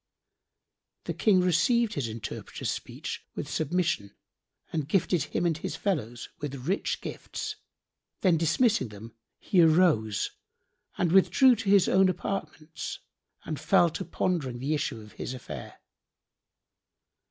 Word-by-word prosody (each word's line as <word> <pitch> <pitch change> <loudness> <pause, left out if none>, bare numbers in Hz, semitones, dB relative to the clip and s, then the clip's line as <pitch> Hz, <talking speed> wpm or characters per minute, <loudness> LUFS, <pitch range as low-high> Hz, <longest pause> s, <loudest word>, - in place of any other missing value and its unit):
'" - - -59
The - - -2
King 195 -4 +4
received 195 +7 +3
the 130 -5 -2
interpreter's 110 0 -5
speech - - -6
with - - -4
submission 160 - -1 0.6
and 155 -3 -1
gifted 175 -4 +2
him 160 - -2
and 165 -2 +2
his 160 - -4
fellows 120 - -2
with 140 -2 -6
rich 195 +3 -1
gifts; - - -6 0.6
then, 185 -4 +4
dismissing 205 - +2
them 110 +2 -11 0.2
he 185 - +3
arose 155 - +3 0.7
and 175 -2 +1
withdrew 245 +7 +6
to 205 -2 -3
his 195 -2 +6
own 190 0 +5
apartments 175 -3 -4 0.5
and 155 -4 -4
fell 170 +2 +4
to 190 - -4
pondering 165 -7 -1
the 135 +5 -1
issue 145 -6 -2
of 105 0 -13
his 130 - -5
affair. 75 - -9
165 Hz, 130 wpm, -28 LUFS, 130-185 Hz, 0.7 s, withdrew